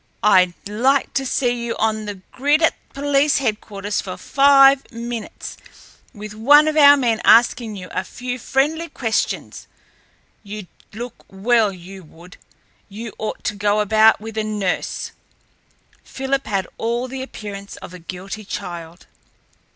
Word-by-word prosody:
I'd 185 -4 +5
like 255 +7 +1
to 270 -1 -1
see 245 -2 0
you 235 -1 -3
on 220 -1 0
the 205 -1 -5 0.2
grid 290 +5 +2
at 320 - +4 0.2
police 285 +1 +2
headquarters 210 -5 -2
for 185 -2 -7
five 275 0 +5
minutes, 235 -1 -7 0.5
with 210 -2 -9
one 290 +8 +6
of 310 - 0
our 285 -1 +8
men 235 -5 0
asking 230 -1 +4
you 185 -2 -8
a - - -2
few 250 0 -6
friendly 310 +8 0
questions! 225 -3 -2 0.7
You'd 210 -1 -8 0.3
look 240 +4 -7
well, 215 +2 +2
you 185 +1 -11
would! 170 +3 -16 0.5
You 220 +3 -8
ought 215 - -4
to 215 - -1
go 205 +1 +1
about 215 +1 +4
with 220 +1 -6
a - - 0
nurse!" 210 -4 -2 0.9
Philip 270 +1 -3
had 195 -3 -1
all 235 +2 -1
the 260 +1 -6
appearance 200 -6 -8
of - - -11
a 180 - -9
guilty 185 +5 -7
child. 170 -3 -7
220 Hz, 145 wpm, -20 LUFS, 200-265 Hz, 0.9 s, our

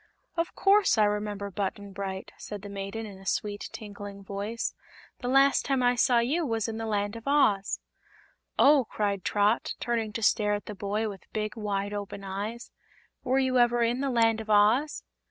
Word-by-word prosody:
"Of 335 +1 -2
course 395 - +4
I 215 - +5
remember 205 -1 -1
Button 200 +1 -4
Bright," 190 -1 -5
replied 205 -1 -7
the 205 - -7
maiden, 200 +3 -5
in 200 -3 -10
a 195 - -14
sweet, 205 0 -2
tinkling 205 -1 -8
voice. 205 +4 -3 0.5
"The 245 - -4
last 270 +2 +4
time 270 -2 +1
I 245 0 +4
saw 245 0 +3
you 270 +9 +1
was 225 -6 -1
in 225 -1 -4
the 225 - -3
Land 205 0 -1
of 230 +3 -9
Oz." 215 -9 +3 0.8
"Oh!" 280 -3 +6
cried 200 -2 -1
Trot, 210 +2 +1
turning 230 -3 -1
to 225 - -3
stare 210 -1 +3
at 205 - -6
the 210 - -6
boy 205 +2 -2
with 195 -3 -9
big, 215 +1 -2
wide 205 -2 -2
open 200 -1 -5
eyes; 205 +5 -5 0.5
"were 260 +1 +1
you 260 -1 +2
ever 240 0 +4
in 240 +3 +1
the 275 - 0
Land 225 -2 +3
of 220 - -10
Oz?" 215 +8 +3
215 Hz, 190 wpm, -28 LUFS, 205-240 Hz, 0.8 s, Oh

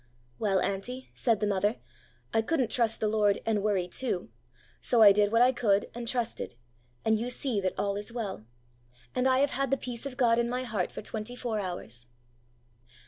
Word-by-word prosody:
'Well, 195 -3 +2
auntie,' 245 +7 -3
said 230 -4 +1
the - - +2
mother, 205 +2 +1 0.6
'I 225 - +4
couldn't 255 -1 0
trust 230 -3 +2
the 215 - +1
Lord 210 -2 +2
and 215 -2 +1
worry 195 -4 +1
too; 190 -2 -2 0.5
so 235 -3 +4
I 205 - +10
did 205 +1 +3
what 230 +1 +5
I 255 - +5
could 205 -5 +1
and 235 0 -6
trusted, 235 - -2 0.5
and 220 -1 +3
you 240 +2 -2
see 245 -4 0
that 185 -1 -2
all 200 -1 0
is 205 +2 -5
well. 210 - -4 0.7
And 250 - +1
I 260 0 +4
have 285 - +2
had 275 0 -1
the 275 - +2
peace 245 -2 -6
qf 255 -2 -8
God 235 -3 +4
in 235 0 +1
my 250 +1 -2
heart 215 -7 -2
for - - -7
twenty 220 +2 -5
four 235 -4 -2
hours. 150 - -4
225 Hz, 195 wpm, -29 LUFS, 205-245 Hz, 0.7 s, I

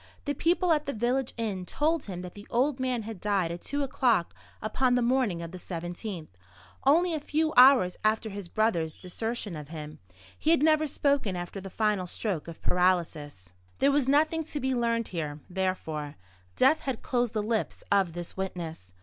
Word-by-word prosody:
The 285 - 0
people 345 +4 +2
at 300 -2 +2
the 280 - -1
village 245 +3 0
inn 210 -5 -2
told 310 - 0
him 180 -3 -6
that 180 - -8
the 205 0 -12
old 260 +3 +1
man 255 -3 -1
had 215 -3 -7
died 195 -5 +1
at 170 0 -6
two 285 0 -2
o'clock 240 -9 +1 0.3
upon 245 +4 +1
the 245 - +2
morning 235 -9 +1
of 165 - -7
the 185 - -7
17th, 175 +1 -5 0.6
only 335 +5 +4
a 315 - -1
few 310 +2 0
hours 250 -8 +7
after 220 0 +1
his 200 -2 -6
brother's 170 -8 +1
desertion 210 +1 -4
of 150 -2 -7
him. 155 -1 -8 0.4
He 310 - 0
had 325 -3 +4
never 310 0 +4
spoken 280 -9 +1
after 175 +2 -5
the 195 - -7
final 210 -2 0
stroke 180 -4 -2
of 170 - -10
paralysis. 160 - 0 0.2
There 275 - +4
was 280 -2 +2
nothing 310 +3 +3
to 295 - -4
be 265 0 0
learned 230 -2 0
here, 155 -4 -4
therefore. 170 -6 -3 0.4
Death 310 - +5
had 265 -4 -4
closed 245 -2 0
the 215 -2 0
lips 220 0 -2
of 195 -4 +3
this 175 0 -6
witness. 165 - -5
215 Hz, 185 wpm, -28 LUFS, 175-265 Hz, 0.6 s, hours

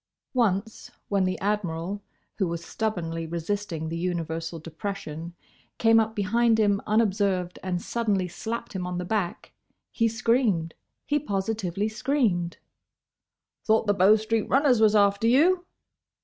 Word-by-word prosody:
Once, 220 -3 0 0.2
when 195 -2 +2
the 185 0 -1
Admiral, 195 -1 -2 0.4
who 190 - +2
was 170 0 -4
stubbornly 165 -7 -3
resisting 170 0 -3
the 165 - -4
universal 165 -2 -3
depression, 165 0 -6 0.4
came 225 0 +5
up 220 0 0
behind 225 +3 +2
him 205 -2 +3
unobserved 200 -4 +1
and 180 -2 -3
suddenly 210 -6 0
slapped 230 +7 -5
him 180 -2 -3
on 180 0 -3
the 180 - -3
back, 190 -3 -2 0.4
he 230 - +2
screamed—he 230 - 0
positively 200 - -2
screamed. 215 -8 0 1.1
"Thought 220 0 +3
the 205 - +3
Bow 200 +2 +6
street 220 0 -1
runners 265 -4 +4
was 215 -1 +5
after 200 +1 +3
you?" 350 +9 +4
200 Hz, 130 wpm, -26 LUFS, 175-225 Hz, 1.1 s, Bow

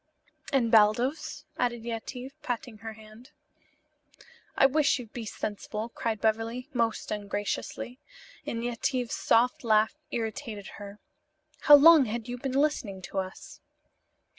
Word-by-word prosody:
"And 250 -5 +2
Baldos?" 250 +8 +2
added 240 -2 0
Yetive, 245 +3 -5
patting 240 -2 -4
her 225 +1 -7
hand. 220 +3 -15 1.3
"I - - +6
wish 285 +2 +3
you'd 235 -4 -10
be 230 -3 -6
sensible," 210 +2 -4
cried 225 -2 -3
Beverly, 225 +5 -1
most 230 -3 -1
ungraciously, 205 +4 -4 0.4
and 230 0 -4
Yetive's 245 +1 -1
soft 245 +3 +2
laugh 215 -1 +3 0.2
irritated 225 -3 -4
her. 200 0 -9 0.6
"How 295 - +9
long 305 0 +8
had 230 +1 -4
you 245 0 -5
been 265 0 -3
listening 265 -10 0
to 190 +2 -3
us?" 190 0 -7
230 Hz, 125 wpm, -28 LUFS, 215-255 Hz, 1.3 s, How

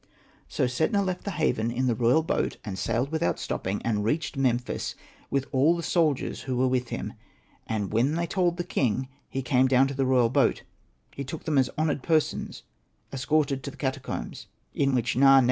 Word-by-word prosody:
So - - 0
Setna 160 - +1
left 185 -1 -3
the - - -1
haven 115 -8 +1
in 125 +2 -1
the 125 - +2
royal 125 +7 +3
boat, - - -1
and 100 -3 -4
sailed 115 - -1
without 160 +1 0
stopping, 95 +2 -3
and 105 -3 0
reached 155 +9 -1
Memphis 125 -3 -1 0.3
with 140 -1 0
all 145 +5 +4
the 170 - -4
soldiers 155 -7 +1
who 130 -2 -3
were 130 +1 +3
with 125 -1 0
him. - - -4 0.5
And 105 -2 -2
when 130 +7 +2
they 170 0 0
told 175 0 0
the 175 - -1
king 130 - -1 0.2
he 135 - -3
came 130 +1 +3
down 130 +1 +4
to - - -4
the 135 -1 0
royal 125 -3 +4
boat. 130 - +2 0.5
He 140 - -4
took 150 +4 -7
them 150 -4 +2
as 130 - +2
honoured 155 -3 0
persons 155 +1 0 0.5
escorted 135 0 +1
to 135 - -5
the - - -13
catacombs, 135 -1 -4 0.3
in 140 -2 +1
which 120 0 0
Na. 135 +1 +7
135 Hz, 195 wpm, -27 LUFS, 125-155 Hz, 0.5 s, Na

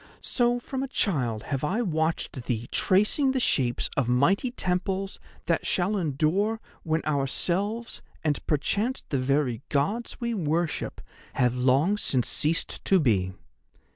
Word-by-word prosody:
So 240 -1 +2
from 260 +2 -4
a 270 - -2
child 125 - 0
have 135 -2 -3
I 200 +10 0
watched 160 - -1
thee 120 -1 -2
tracing 210 +8 +3
the 265 - +1
shapes 125 - +1
of 125 -3 +1
mighty 170 - +3
temples 190 -2 -1 0.3
that 170 0 +1
shall 190 +3 +1
endure 180 +6 +1 0.2
when 160 0 -1
ourselves, 180 - -1 0.2
and 150 -2 0
perchance 205 - 0
the 140 - 0
very 130 -2 +1
Gods 200 +12 -1
we 235 -1 -1
worship, 165 -4 -1 0.3
have 125 -2 +2
long 135 +11 +3
since 125 - +1
ceased 155 +2 +1
to 190 - +4
be. 95 - +1
165 Hz, 140 wpm, -27 LUFS, 135-205 Hz, 0.3 s, to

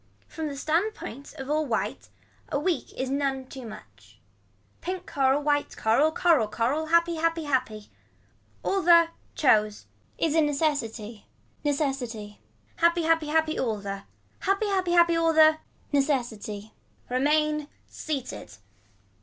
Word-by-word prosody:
From 320 -1 -5
the 280 -1 -6
standpoint 310 - -2
of 270 -3 -7
all 305 +2 +1
white 235 -7 -3 0.4
a - - +1
week 340 +2 -1
is 260 0 -3
none 275 -1 -1
too 255 -2 -9
much. 215 - -14 0.6
Pink 370 0 -4
coral 275 -2 +1
white 290 0 0
coral, 270 +8 +3
coral 315 -9 +3
coral. 255 +9 -1
Happy 335 0 +3
happy 330 0 0
happy. 255 -7 -2 0.7
All 390 0 +1
the, 335 -1 +6 0.3
chose. 215 -7 +2 0.3
Is 320 -2 +1
a 320 - +4
necessity. 275 -8 -2 0.4
Necessity. 260 -8 -2 0.4
Happy 340 0 +3
happy 325 -1 +2
happy 315 +1 +1
all 225 -4 0
the. 200 -1 -5 0.4
Happy 395 +2 +1
happy 370 -3 +1
happy 340 -1 +5
all 330 0 +2
the. 315 0 +6 0.3
Necessity. 235 -7 -1 0.3
Remain 300 +3 +1 0.2
seated. 260 - -6
290 Hz, 130 wpm, -26 LUFS, 250-325 Hz, 0.7 s, the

